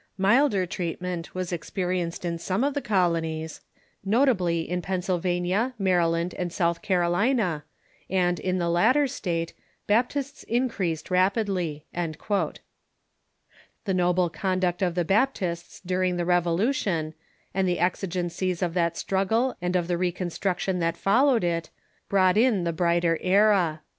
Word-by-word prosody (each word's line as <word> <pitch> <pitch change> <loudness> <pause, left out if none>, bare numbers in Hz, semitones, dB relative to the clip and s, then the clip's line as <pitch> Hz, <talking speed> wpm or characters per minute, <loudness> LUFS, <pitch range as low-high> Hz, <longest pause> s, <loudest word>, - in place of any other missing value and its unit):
Milder 205 0 +3
treatment 180 0 -4
was 185 -1 -3
experienced 175 0 -3
in 170 -1 -2
some 190 +7 -1
of 285 +1 +1
the 285 - -2
colonies, 165 - -1 0.4
notably 195 -7 +2
in 180 0 -2
Pennsylvania, 185 +5 -1
Maryland, 175 -3 +1
and 175 -1 -2
South 170 -1 0
Carolina, 180 - +1 0.5
and 180 -2 +1
in 185 +3 -1
the 175 -1 0
latter 255 +13 +3
state 170 -10 -3 0.3
Baptists 255 +6 0
increased 205 -10 -1
rapidly." 185 -5 0
The 165 -3 -4 1.7
noble 180 -1 +2
conduct 185 +2 -1
of 175 -3 0
the 175 -2 0
Baptists 195 -5 0
during 180 0 0
the 175 - -1
Revolution, 175 - +1 0.4
and 190 0 +1
the 180 - +1
exigencies 180 0 -1
of 170 -2 -1
that 170 -1 0
struggle 220 +7 0
and 180 +1 -1
of 175 -2 +1
the 175 -1 -1
reconstruction 180 +1 -1
that 165 0 0
followed 240 +2 +3
it, 170 -1 -1 0.4
brought 185 -1 +3
in 225 -5 +3
the 170 -1 -1
brighter 170 0 +1
era. 185 -5 +3
180 Hz, 130 wpm, -26 LUFS, 170-195 Hz, 1.7 s, Milder